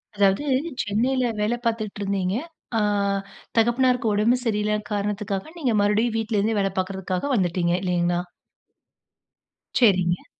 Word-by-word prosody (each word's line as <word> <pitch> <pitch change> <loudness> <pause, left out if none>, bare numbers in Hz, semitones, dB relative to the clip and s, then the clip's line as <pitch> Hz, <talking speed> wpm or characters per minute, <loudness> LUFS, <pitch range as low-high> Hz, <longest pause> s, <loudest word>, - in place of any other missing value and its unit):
அதாவது, 200 +5 +3 0.4
சென்னையில 245 +4 +1
வேலை 220 +3 +1
பார்த்துட்டு 215 -3 -2
இருந்தீங்க. 195 -1 -1 0.4
அ - - +3 0.8
தகப்பனாருக்கு 240 0 +3
உடம்பு 225 +5 +3
சரியில்ல 210 -1 +1 0.2
காரணத்துக்காக, 205 - -2
நீங்க 255 -8 0
மறுபடியும் 215 +3 +2
வீட்டில 220 -1 0
இருந்தே 215 +1 +1
வேலை 195 -1 0
பார்க்கறதுக்காக 190 +6 -2
வந்துட்டீங்க. 175 -3 +1
இல்லைங்களா? 175 -1 +1 1.6
சரிங்க. 185 -6 +3
210 Hz, 110 wpm, -24 LUFS, 190-230 Hz, 1.6 s, அதாவது